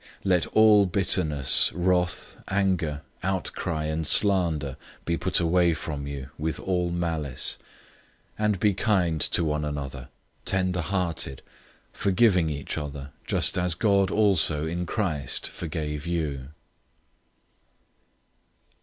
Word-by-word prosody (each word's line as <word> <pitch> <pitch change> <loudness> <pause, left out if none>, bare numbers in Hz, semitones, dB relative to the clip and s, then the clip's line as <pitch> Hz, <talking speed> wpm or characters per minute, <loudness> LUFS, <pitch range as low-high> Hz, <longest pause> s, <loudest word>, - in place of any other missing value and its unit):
004:031 - - -23 0.2
Let 90 -3 +2
all 110 -2 +5
bitterness, 80 -7 +2
wrath, 90 0 0
anger, 90 -6 0 0.2
outcry, 85 -4 -2
and 80 0 -2
slander, 85 -9 +3 0.3
be 85 - 0
put 90 +2 +1
away 85 0 +3
from 75 -3 -5
you, 70 -1 -7
with 80 +1 -2
all 90 -2 -1
malice. 80 -6 -1 0.8
004:032 105 - +1
And 105 -3 +1
be 105 +1 +3
kind 90 -6 +1
to 85 - +2
one 75 -1 -1
another, 70 -4 -5 0.4
tenderhearted, 90 -6 -1 0.5
forgiving 95 -4 +2
each 70 -2 -4
other, 70 -1 -7 0.2
just - - +1
as 90 -2 0
God 100 0 +2
also 85 -8 +3
in 85 +2 -3
Christ 80 - -1
forgave 75 -2 -5
you. 75 -6 -2
85 Hz, 115 wpm, -26 LUFS, 75-95 Hz, 0.8 s, all